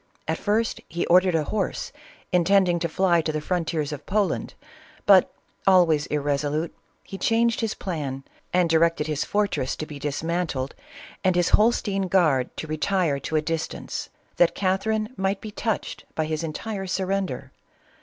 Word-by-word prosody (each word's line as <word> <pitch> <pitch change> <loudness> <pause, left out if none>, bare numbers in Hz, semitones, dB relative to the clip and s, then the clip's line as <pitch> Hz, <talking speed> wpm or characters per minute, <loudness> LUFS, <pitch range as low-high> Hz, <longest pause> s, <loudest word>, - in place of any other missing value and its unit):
At - - -1
first 220 +2 0
he 170 +1 -2
ordered 180 0 +4
a 160 - +2
horse, 205 +6 -2 0.4
intending 180 0 +3
to 170 0 -1
fly 175 0 +3
to 155 - -1
the 155 - -2
frontiers 160 -2 -1
of 145 - -7
Poland, 205 -1 0 0.5
but, - - +6 0.4
always 170 -6 +5
irresolute, 145 +2 -1 0.3
he 195 - -8
changed 230 0 +2
his 225 -2 -1
plan 140 -7 -4 0.3
and 180 -1 +3
directed 165 -1 +3
his 150 -1 -1
fortress 200 -10 0
to 155 - -5
be 150 -2 -9
dis 145 +1 -3
mantled 165 -6 -2 0.5
and 185 -1 +3
his 175 -1 +3
Holstein 210 -3 +2
guard 155 -9 +3
to - - -4
retire 155 -1 0
to 155 - -4
a 155 - +2
distance, 165 0 -4 0.3
that 175 - +4
Catherine 215 +4 0
might 195 +1 0
be 215 - -8
touched 220 0 -3
by 155 - 0
his 155 0 -2
entire 195 +5 -4
surrender. 190 +1 -2
175 Hz, 155 wpm, -25 LUFS, 155-195 Hz, 0.5 s, but